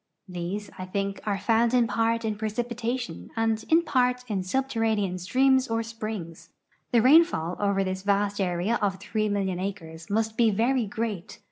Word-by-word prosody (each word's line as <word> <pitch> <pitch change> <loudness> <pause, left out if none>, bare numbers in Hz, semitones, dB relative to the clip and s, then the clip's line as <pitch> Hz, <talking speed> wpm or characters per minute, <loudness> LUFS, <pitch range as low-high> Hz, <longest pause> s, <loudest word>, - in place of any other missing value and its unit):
These, 185 +3 -5
I 185 - -4
think, 195 +1 -3
are 200 -2 +1
found 230 +4 +2
in 245 -1 +4
part 230 0 0
in 215 -1 -1
precipi 220 +3 -3
tation, 235 - -4
and, 225 -1 0
in 330 +1 +5
part, 250 -4 +1
in 205 -4 -1
subterranean 220 -3 0
streams 260 +7 +3
or 225 0 -1
springs. 215 -7 -7 0.4
The 235 -2 +4
rainfall 260 - +4
over 200 -1 +1
this 190 0 -3
vast 200 0 +1
area 185 +5 0
of 200 -2 +1
three 215 +1 -1
million 195 -3 -1
acres 165 -4 -6
must 220 +1 0
be 230 -2 +5
very 230 +3 +1
great. 215 -4 -4
215 Hz, 165 wpm, -26 LUFS, 195-235 Hz, 0.4 s, in